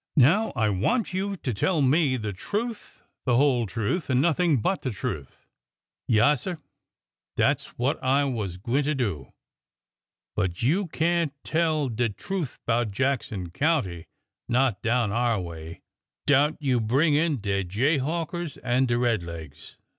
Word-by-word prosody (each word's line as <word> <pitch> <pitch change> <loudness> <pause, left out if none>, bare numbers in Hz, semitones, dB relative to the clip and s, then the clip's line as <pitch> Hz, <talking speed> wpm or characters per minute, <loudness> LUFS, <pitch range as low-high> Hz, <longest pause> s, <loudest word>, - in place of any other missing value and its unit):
" - - -62
Now 175 - +5
I 110 -3 +2
want 180 - 0
you 195 +1 -2
to 130 -7 -3
tell 155 - +1
me 135 -1 +3
the 110 -3 -4
truth, 215 - -5 0.2
the 125 -3 +3
whole 125 -3 +3
truth, 115 - -2
and 130 -1 +3
nothing 165 -1 +3
but 185 - 0
the 130 - -2
truth." 75 - -6 0.3
" - - -44
Yaassir, 145 - +3 0.8
dat>'s - - +2
what 130 +5 -1
I 135 +2 +3
was 110 -10 -3
gwineter 140 +9 0
do. 95 - -2 1.0
But 90 +1 -1
you 175 - +2
can't 165 -2 0
tell 160 -3 +1
de 120 -1 0
truth 165 - -4
'bout 120 -1 +1
Jackson 105 -6 -2
County— 105 - 0 0.4
not 120 -5 +2
down 115 -2 +1
our 115 -1 +1
way— 85 -2 -8 0.4
'dout 145 +2 +3
you 130 -5 +1
bring 135 +8 +2
in 150 -2 +2
de 100 -1 -1
jayhawkers 150 - -1
an' 130 +1 +2
de 120 0 +1
red 120 -5 +1
legs. 80 -4 -9
130 Hz, 145 wpm, -26 LUFS, 105-155 Hz, 1.0 s, Now